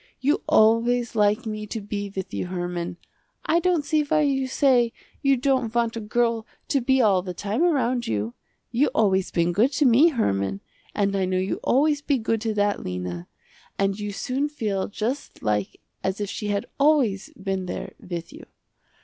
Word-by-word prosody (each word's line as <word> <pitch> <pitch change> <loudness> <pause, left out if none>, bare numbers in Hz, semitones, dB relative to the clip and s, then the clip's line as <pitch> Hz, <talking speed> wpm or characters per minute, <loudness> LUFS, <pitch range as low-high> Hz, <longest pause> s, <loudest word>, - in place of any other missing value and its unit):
You 290 +9 +1
always 230 +2 +3
like 210 +3 +2
me 215 -1 -4
to 225 - -4
be 205 -1 -5
with 190 -1 -5
you - - -2
Herman. 175 -1 -4 0.5
I 335 - +3
don't 345 -4 +1
see 305 +1 +2
why 305 +1 +1
you 270 -2 +1
say 255 -3 +3 0.3
you 275 -1 +3
don't 255 -3 0
want 235 -1 +1
a - - -3
girl 230 +1 0 0.2
to 275 - +2
be 265 +1 +3
all 195 -4 +4
the 180 -1 -6
time 205 - -2
around 255 -8 +1
you. 110 +1 -2 0.4
You 255 +5 +3
always 190 -3 +2
been 170 0 +1
good 225 +9 +3
to 295 - +2
me 255 +6 +6
Herman, 100 - 0 0.3
and 200 -1 +1
I 190 -1 +1
know 185 0 0
you 185 +1 -1
always 290 +2 +2
be 285 -1 +1
good 225 -1 -1
to 220 -1 -1
that 205 0 +1
Lena, 90 -1 -5 0.5
and 195 +1 0
you 205 0 -3
soon 265 +8 -2
feel 210 -9 -2
just 235 +7 -4
like 105 -2 -1 0.2
as 190 +1 -1
if 205 -1 -3
she 210 - -4
had 200 -1 -1
always 275 -10 +3
been 190 -1 -3
there - - -5
with 170 -2 -6
you. - - -12
220 Hz, 185 wpm, -24 LUFS, 190-265 Hz, 0.5 s, me